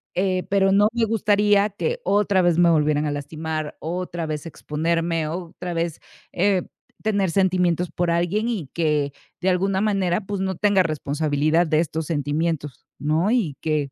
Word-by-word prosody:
Eh, 185 0 +1
pero 195 -1 +3
no 205 +2 +5
me 235 -1 +2
gustaría 205 -1 +3
que 485 - -3
otra 200 -2 +2
vez 175 -2 +2
me 175 -1 +5
volvieran 150 -1 +2
a 145 - -1
lastimar, 155 +1 -4
otra 175 0 -4
vez 155 0 -4
exponerme, 165 +1 -1
otra 175 +1 -5
vez, 165 -1 -2 0.3
eh, 185 0 +2 0.4
tener 200 -5 +1
sentimientos 180 -2 +1
por 175 -1 -1
alguien, 185 +7 0
y 190 - -3
que 150 -4 0 0.3
de 185 - +1
alguna 190 +1 +1
manera, 195 -3 +1
pues, 200 -1 -3
no 190 -1 -1
tenga 200 -1 +3
responsabilidad 155 +1 +1
de 155 0 +2
estos 160 -1 -2
sentimientos, 150 -2 -2
¿no? 160 +8 +1
Y 190 - +1
que 150 -3 -1
170 Hz, 160 wpm, -23 LUFS, 155-195 Hz, 0.4 s, no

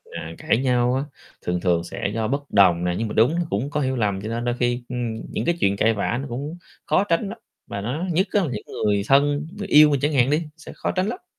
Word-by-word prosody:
à, 80 - -5
cãi - - +1
nhau 125 -1 +2
á, 135 - 0 0.4
thường 90 0 -1
thường 85 -2 +2
sẽ 90 +3 -4
do 110 0 -1
bất 140 +4 -1
đồng 90 -4 +5
nè, 90 0 0
nhưng 115 - -1
mà 105 - -5
đúng 120 +9 +3
nó 175 - 0
cũng 115 +8 -1
có 150 0 -1
hiểu 130 -1 0
lầm, 100 -5 0
cho 105 - -5
nên 115 +1 -3
đôi 120 0 0
khi, 120 0 0
ưm, 120 -3 -3
những - - -2
cái 170 +1 +1
chuyện 100 -6 +2
cãi 110 +2 +3
vã 110 +2 -1
nó 140 - -6
cũng 140 +8 -5 0.3
khó 190 - +3
tránh 195 +1 0
lắm, 220 - -7 0.3
và 100 - -5
nó 130 - -3
nhất 185 +5 +2
á 205 - +3
là 160 - -2
những 105 - -5 0.2
người 100 -1 +2
thân, 145 +2 +3
người 205 - -5
yêu 150 0 +7
mình 140 -2 +1
chẳng 145 +3 0
hạn 130 -2 +3
đi, 150 +3 +1
sẽ 160 - -11
khó - - -2
tránh 185 +1 0
lắm. 295 - -5
125 Hz, 275 wpm, -23 LUFS, 105-150 Hz, 0.4 s, yêu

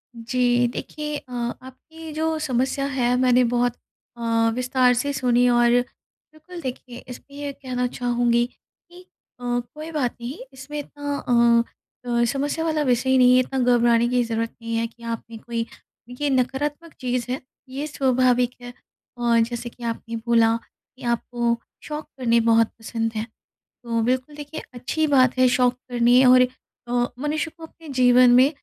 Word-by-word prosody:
जी। 245 +1 +1
देखिए 300 -1 -5
अ, 265 -4 -14
आपकी 260 +7 -7
जो 320 +1 -1
समस्या 265 -1 0
है 245 -1 +2
मैंने 250 -1 +4
बहुत 245 0 +1 0.4
अ, - - -10 0.3
विस्तार 250 0 +3
से 285 +4 -1
सुनी 250 -2 +2
और 240 0 +4 0.6
बिल्कुल 335 +3 -11
देखिए, 250 -1 -6
इसमें 280 +3 -11
ये 290 -1 -4
कहना 255 -2 -3
चाहूँगी 240 -1 +1
कि 350 +7 -19 0.4
अ, 245 - -12 0.3
कोई 310 +2 -7
बात 275 -6 -1
नहीं 245 +5 -5 0.2
इसमें 270 +3 -7
इतना 285 0 -5
अ 235 -1 +3 0.5
अ, 235 0 +3
समस्या 285 +6 -1
वाला 310 -2 0
विषय 260 0 +2
नहीं 250 0 +6
है - - +6
इतना 265 +1 -1 0.2
घबराने 235 0 +3
की 250 -1 +2
ज़रूरत 230 0 -2
नहीं 230 0 -3
है, 230 0 0
कि 235 +1 -20
आपने 230 0 -6
कोई 230 0 -4 0.4
ये 280 +4 -2
नकारात्मक 280 +5 -1
चीज़ 250 -1 -1
है, 260 - -3 0.3
ये 275 +3 -4
स्वाभाविक 255 -3 +2
है 245 0 -9 0.4
और 235 -1 +2
जैसे 240 +1 -2
कि 240 0 -15
आपने 230 0 -4
बोला 230 -1 +4
कि 255 +2 -21
आपको, 235 0 0 0.3
शौक़ 300 0 -5
करने 235 -2 +3
बहुत 230 0 +4
पसंद 225 0 -3
है। 215 - -1 0.6
तो 230 -1 -1
बिल्कुल 255 +5 -1
देखिए 295 +1 -7
अच्छी 250 +6 -1
बात 260 -3 +4
है, 255 0 +5
शौक़ 250 0 +3 0.2
करने 245 +1 +4
और 255 0 +7 0.5
अ, 245 0 +1
मनुष्य 300 +2 -2
को 330 - -12
अपने 320 0 -16
जीवन 250 -1 +5
में 260 +3 +6
250 Hz, 160 wpm, -23 LUFS, 240-280 Hz, 0.6 s, और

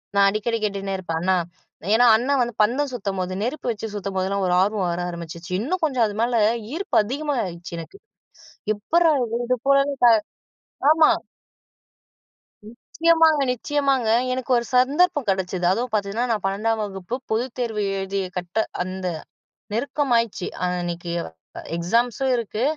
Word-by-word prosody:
நான் 200 0 +6
அடிக்கடி 215 +3 -1
கேட்டுன்னே 195 -1 -2
இருப்பேன், 165 -3 -3
அண்ணா. 185 +1 +2 0.6
ஏன்னா 245 - +5
அண்ணா 250 +5 +1
வந்து 240 -1 -1
பந்தம் 260 +7 +2
சுத்தும்போது, 195 -5 -3
நெருப்பு 250 +3 -2
வச்சு 220 0 -5
சுத்தும்போதெல்லாம் 195 -1 -1
ஒரு 180 - +1
ஆர்வம் 200 -1 +1
வர 170 +1 -2
ஆரம்பிச்சுச்சு. 170 0 -8
இன்னும் 335 - -2
கொஞ்சம் 260 -7 +2
அது 210 -1 -4
மேல 235 0 +2 0.3
ஈர்ப்பு 385 +4 -1
அதிகமா 285 +5 -2
ஆயிடுச்சு 170 -1 -7
எனக்கு. 395 - -10 0.8
எப்புட்றா! 320 +10 +3 0.3
இது 255 0 +1
போல 275 0 +6 0.2
கா 240 - +8 0.8
ஆமா. 315 -1 +5 1.6
நிச்சயமாங்க 320 +5 +2
நிச்சயமாங்க. 270 -1 0 0.2
எனக்கு 255 0 -3
ஒரு 235 - -1
சந்தர்ப்பம் 290 +3 +3
கெடைச்சது. 185 -1 -1
அதுவும் 235 +4 -1
பார்த்தீங்கன்னா, 215 +3 0
நான் 215 -3 0
12 200 +4 0
வகுப்பு 195 +2 -4 0.2
பொதுத்தேர்வு 235 -2 -1 0.2
எழுதி 195 +1 -2 0.2
கட்ட 180 +5 -1 0.2
அந்த 185 +1 -6 0.7
நெருக்கமாயிடுச்சு, 235 -5 0 0.2
அன்னைக்கு 175 -1 -3 0.6
எக்ஸாம்ஸும் 235 +8 +1
இருக்கு. 225 -1 -3
220 Hz, 130 wpm, -23 LUFS, 190-255 Hz, 1.6 s, கா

